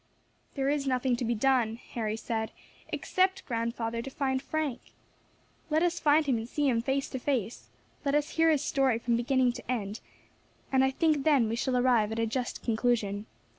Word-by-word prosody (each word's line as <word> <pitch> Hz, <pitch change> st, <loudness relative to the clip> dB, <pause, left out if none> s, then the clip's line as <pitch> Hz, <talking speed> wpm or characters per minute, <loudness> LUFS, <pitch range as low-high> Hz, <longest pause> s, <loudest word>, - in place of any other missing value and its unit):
"There 270 Hz, -1 st, 0 dB
is 285 Hz, -1 st, 0 dB
nothing 255 Hz, -1 st, +1 dB
to 245 Hz, -, -3 dB
be 235 Hz, 0 st, 0 dB
done," 240 Hz, -2 st, +2 dB
Harry 220 Hz, -2 st, -4 dB
said, 220 Hz, -1 st, -2 dB, 0.4 s
"except, 375 Hz, +1 st, 0 dB
grandfather, 230 Hz, -1 st, -2 dB
to 270 Hz, -, -6 dB
find 265 Hz, -1 st, -1 dB
Frank. 300 Hz, -3 st, -2 dB, 0.9 s
Let 315 Hz, +2 st, +2 dB
us 350 Hz, 0 st, +1 dB
find 300 Hz, +1 st, +4 dB
him 255 Hz, -5 st, +1 dB
and 225 Hz, +2 st, -7 dB
see 295 Hz, +1 st, 0 dB
him 235 Hz, -3 st, +2 dB
face 270 Hz, +3 st, -1 dB
to 260 Hz, -, -4 dB
face; 245 Hz, -5 st, -2 dB, 0.3 s
let 280 Hz, 0 st, +1 dB
us 295 Hz, 0 st, +1 dB
hear 325 Hz, 0 st, +3 dB
his 300 Hz, -4 st, +2 dB
story 270 Hz, -5 st, +2 dB
from 235 Hz, 0 st, 0 dB
beginning 250 Hz, +1 st, +2 dB
to 245 Hz, -, -6 dB
end, 210 Hz, -3 st, -3 dB, 0.7 s
and 265 Hz, -1 st, +4 dB
I 265 Hz, -, +4 dB
think 300 Hz, +1 st, +1 dB
then 280 Hz, -7 st, +4 dB
we 225 Hz, -, -1 dB
shall 250 Hz, +1 st, 0 dB
arrive 245 Hz, -4 st, +3 dB
at 220 Hz, -, -3 dB
a 230 Hz, -, +1 dB
just 245 Hz, +2 st, -3 dB
conclusion. 220 Hz, -3 st, 0 dB
255 Hz, 190 wpm, -29 LUFS, 230-280 Hz, 0.9 s, find